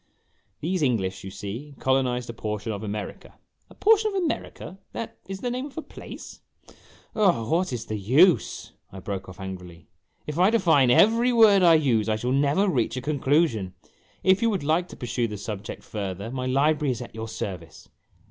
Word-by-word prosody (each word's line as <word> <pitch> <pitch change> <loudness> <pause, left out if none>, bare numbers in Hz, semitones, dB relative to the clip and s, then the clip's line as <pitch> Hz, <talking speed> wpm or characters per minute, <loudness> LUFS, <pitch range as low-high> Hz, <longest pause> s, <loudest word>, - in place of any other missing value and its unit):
"These 180 +3 -1
English, 105 -9 0
you 95 - -6
see, 115 +10 -7
colonized 125 -2 0
a 115 - -6
portion 105 0 -4
of 100 -2 -5
America 105 -1 -6
" - - -53
" - - -43
A - - -16
portion 435 0 +4
of 415 - -3
America 310 - -4
that 230 - -6
is 195 0 -6
the 245 - -2
name 255 +3 -3
of 290 - -16
a 320 - -3
place? - - -11 0.2
" - - -22
" - - -28
Oh, 180 - +2
what 175 +1 +1
is 120 -3 -4
the 110 -1 -4
use! 145 - +3
" - - -43
I 95 - -9
broke 95 0 -5
off 90 - -12
angrily. 90 -3 -9 0.2
" - - -43
If 150 +2 -4
I 185 +2 +6
define 165 - +4
every 230 - +5
word 220 -5 +6
I 170 -2 +7
use, 120 -8 +2
I 110 - +2
shall 120 +4 -2
never 145 +9 +2
reach 125 - 0
a - - 0
conclusion. 135 - +1 0.5
If 190 +1 +4
you 230 - +3
would 195 -8 -1
like 160 +4 +1
to - - -11
pursue 120 -2 -2
the 105 -1 -6
subject 105 0 -6
further, 100 +1 -5
my 130 0 -3
library 145 +2 +2
is 120 +1 -6
at - - -12
your 110 +1 -6
service." 90 -7 -7
130 Hz, 205 wpm, -25 LUFS, -, 0.5 s, I